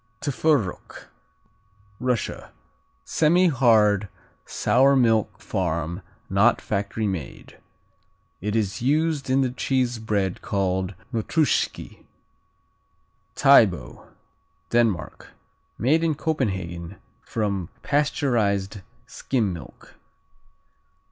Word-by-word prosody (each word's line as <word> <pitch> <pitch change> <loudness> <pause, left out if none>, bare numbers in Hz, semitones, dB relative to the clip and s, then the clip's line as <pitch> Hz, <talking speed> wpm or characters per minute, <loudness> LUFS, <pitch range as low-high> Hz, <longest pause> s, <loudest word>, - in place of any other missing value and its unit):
Tworog 140 - -1 1.0
Russia 125 -2 -2 0.5
Semihard 125 - +3 0.4
sour 135 +3 +3
milk 115 -4 +2
farm 85 +6 -3 0.3
(not 100 +5 +3
factory) 105 +2 -3
made. 90 -10 -6 0.8
It 105 +3 -2
is 105 -2 -1
used 150 +1 0
in 135 +1 +3
the 130 -2 0
cheese 125 -2 -1
bread 100 -4 -2
called 95 -1 -1 0.2
Notruschki. 140 +7 -1 1.3
Tybo 115 -10 +3 0.6
Denmark 115 -8 -1 0.4
Made 150 +9 +2
in 160 -2 +1
Copenhagen 95 - -3 0.3
from 100 -5 -3
pasteurized 110 -9 0 0.2
skim 110 -8 -2
milk. 85 - -12
115 Hz, 75 wpm, -24 LUFS, 100-135 Hz, 1.3 s, Semihard